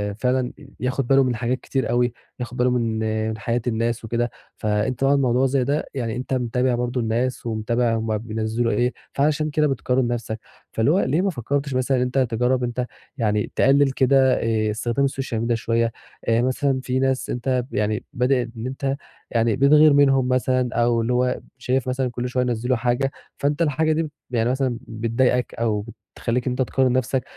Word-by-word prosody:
فعلًا 125 +2 0
ي 145 - -13
ياخد 130 0 -1
باله 135 +1 +5
من 125 -2 0
حاجات 125 +3 -1
كتير 135 +1 -2
أوي، 120 0 +2 0.3
ياخد 125 0 -5
باله 125 +1 +3
من 115 -3 0 0.3
من 110 - -4
حياة 115 +2 -1
الناس 115 0 -1
وكده، 120 +1 -1 0.3
فأنت 110 +4 -1
بقى 135 +1 +4
الموضوع 130 -2 +2
زي 135 0 +2
ده 145 +4 0
يعني 115 -5 -2
أنت 130 +2 -4
متابع 125 0 +1
برضه 125 +1 -1
الناس 120 +3 -1
ومتابع 115 +1 0
هُم 110 -1 -1
بينزّلوا 110 +1 -1
إيه، 125 +1 +1 0.2
فعشان 150 +2 +1
كده 150 0 +2
بتقارن 130 -2 0
نَفسك، 115 -2 -3 0.3
فاللي 115 +7 +2
هو 190 - +3
ليه 150 +3 +1
ما 195 - +1
فكّرتش 140 0 -2
مثلًا 130 0 +1
أنت 125 +1 -2
تجرّب 125 0 +1
أنت 125 +1 -1 0.3
يعني 105 -3 0
تقلّل 135 +1 +4
كده 130 0 +4
آآ 110 -1 +1
استخدام 120 +5 0
السوشيال 130 -4 -2
ميديا 115 0 +1
شوية، 115 0 0 0.4
آآ، 115 +1 +3
مثلًا 130 +1 +1
في 130 0 0
ناس 135 -1 0
أنت 125 +1 0
ب - - -15
يعني 105 +2 0
بدل 125 -1 +1
إن 115 +3 -4
أنت 135 +1 -2 0.4
يعني 115 -1 +2
بتغِير 150 +2 +6
منهُم 135 -2 +4
مثلًا 130 0 +1
أو 120 0 +2
اللي 115 +2 0
هو 125 0 +1 0.2
شايف 130 0 -1
مثلًا 130 0 0
كل 125 +1 -3
شوية 125 0 0
ينزّلوا 125 +1 0
حاجة 125 +3 0 0.3
فأنت 145 +3 0
الحاجة 155 +1 +2
دي 155 -1 -1 0.2
بيعني 120 -1 +1
مثلًا 130 -2 0
بتضايقك 115 +2 0
أو 110 -2 -1 0.3
تخلّيك 125 +2 -1
أنت 125 +1 0
تقارن 130 0 +2
نَفسك، 130 0 0
125 Hz, 185 wpm, -23 LUFS, 115-130 Hz, 0.4 s, بتغِير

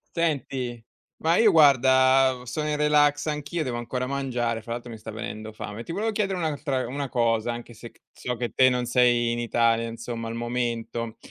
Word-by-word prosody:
Senti 135 -7 -1 0.4
ma 165 +2 +3
io 225 -1 +6
guarda, 130 -3 +5
sono 150 +5 -3
in 150 - 0
relax 150 -1 +3
anch'io, 150 +2 -2
devo 125 -3 -3
ancora 125 +2 -3
mangiare, 125 -4 -2
fra 115 +2 -6
l'altro 120 0 -7
mi 115 - -8
sta 110 - -9
venendo 110 0 -6
fame. 105 0 -7
Ti - - -7
volevo 215 +6 -1
chiedere 200 -3 -1
un'altra 145 -5 -2
una 140 +3 -4
cosa 115 -1 +1
anche 120 0 -8
se 115 +1 -11
c - - -28
so 125 - -4
che 120 0 -3
te 130 +3 +4
non 125 -1 -1
sei 120 -1 +3
in 120 - -2
Italia 115 -1 +1
insomma 115 0 -6
al 115 - -5
momento, 115 -1 -3
125 Hz, 190 wpm, -25 LUFS, 115-145 Hz, 0.4 s, io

